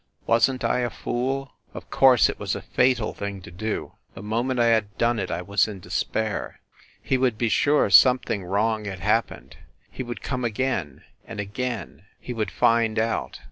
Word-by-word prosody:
Wasn 115 +3 +3
t - - -5
I 125 - +1
a 120 -1 0
fool? 135 +4 -3 0.2
Of - - -10
course 130 -3 +6
it - - -5
was - - -2
a - - -5
fatal 125 -3 +1
thing 100 -1 -5
to 85 - -11
do.... 110 +5 -4 0.2
The 95 - -9
moment 120 +4 -1
I 120 - +4
had 105 -3 +1
done 115 -1 +1
it 95 - -3
I 85 +1 -3
was 100 +4 +2
in 105 -3 -7
despair. 110 +4 -3 0.4
He 130 - +1
would 125 -4 +1
be 115 0 0
sure 145 +8 +3
something 105 0 +5
wrong 105 +4 0
had 95 -3 -6
happened... - - -1 0.3
he - - -6
would 120 -1 -6
come 125 -2 -3
again... 110 - -2 0.2
and 115 -2 -7
again... 105 - -5
he 125 - -6
would 110 -4 -2
find 115 +3 +2
out. 115 +1 -1
115 Hz, 185 wpm, -24 LUFS, 100-125 Hz, 0.4 s, course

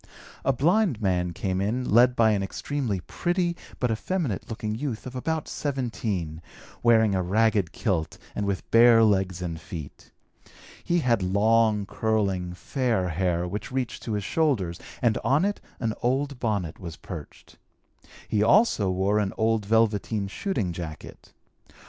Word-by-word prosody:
A - - +3
blind 165 - +2
man 90 -4 0
came 95 +2 -2
in 120 +6 -1
led 120 +3 +5
by 110 -2 +4
an 100 -2 +1
extremely 110 0 -3
pretty 175 - -1 0.2
but 125 -2 +1
effeminate 130 - -2
looking 110 -1 -3
youth 120 -1 -4
of 130 0 -7
about 160 +4 -2
17, 110 - -3 0.4
wearing 110 -3 +4
a 95 - +1
ragged 100 -1 +2
kilt 90 -6 -2 0.2
and 105 - -2
with 95 -4 -2
bare 115 0 +7
legs 95 -4 +1
and 85 -2 -4
feet. 80 -2 -9 0.7
He 175 0 +1
had 120 -6 +2
long, 105 +2 +3
curling, 95 -5 -1
fair 115 -5 -1
hair 90 0 0
which 100 +5 -5
reached 130 -3 -3
to 115 - -4
his 105 -1 -1
shoulders 105 - 0 0.2
and 115 -3 +3
on 145 +7 +3
it 205 0 -2 0.2
an 115 -3 -1
old 135 +2 0
bonnet 100 -9 -2
was 85 -3 -7
perched. 80 -6 -10 0.7
He 105 - +1
also 115 - +4
wore 95 +3 +1
an 100 -2 -1
old 110 -2 +1
velveteen 110 -2 +1
shooting 100 - -2
jacket. 80 -3 -8
110 Hz, 150 wpm, -26 LUFS, 95-125 Hz, 0.7 s, bare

